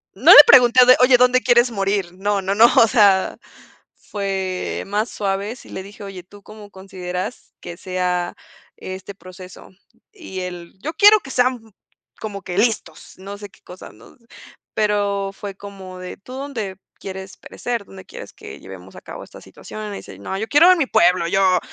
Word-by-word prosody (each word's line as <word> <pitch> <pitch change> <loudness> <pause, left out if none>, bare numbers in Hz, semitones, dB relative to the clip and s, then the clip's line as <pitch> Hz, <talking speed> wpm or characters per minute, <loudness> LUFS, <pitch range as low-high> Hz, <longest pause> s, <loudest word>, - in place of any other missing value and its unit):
No 260 - +5
le - - +11
pregunté 250 -1 +6
de: 255 - +7
"Oye, 250 0 +6
¿dónde 250 +1 +3
quieres 240 0 +3
morir?". 195 -3 -2
No, 200 +1 -1
no, 195 +1 -2
no, 225 +3 +7
o 230 - +7
sea, 200 -5 +3 0.6
fue 190 -2 -4
más 210 +4 -2
suave, 200 +2 -3
sí 255 - -16
le 190 - -7
dije: 205 +1 -13
"Oye, 195 -3 -9
¿tú 205 +2 -17
cómo 210 0 -14
consideras 190 +2 -7
que 170 - -9
sea 180 -1 -3 0.4
este 185 +1 -9
proceso?". 185 0 -13 0.4
Y 315 - -9
él: 175 -2 -8
"Yo 315 - -5
quiero 415 +5 +6
que 295 - -13
sean 250 -1 +1 0.6
como 205 -2 -7
que 180 0 -7
listos, 215 -8 -2
no 200 +2 -9
sé 205 -1 -10
qué - - -25
cosas", 180 +1 -13
¿no? 110 +2 -19 0.6
Pero 200 -2 -1
fue 200 0 -8
como 190 -2 -11
de: 180 - -9
"¿Tú 250 +6 -13
dónde 245 -9 -6 0.2
quieres 190 0 -9
perecer? 235 -4 -6
¿Dónde 190 -1 -13
quieres - - -11
que - - -12
llevemos 95 0 -13
a - - -12
cabo - - -10
esta - - -15
situación?". 215 0 -10
Y - - -6
me 200 - -6
dice: 95 - -12
"No, 145 - -6
yo 220 - -4
quiero 330 +5 +6
en 365 - +3
mi 275 - 0
pueblo, 175 -1 +2
yo 185 0 +2
200 Hz, 185 wpm, -20 LUFS, 185-230 Hz, 0.6 s, le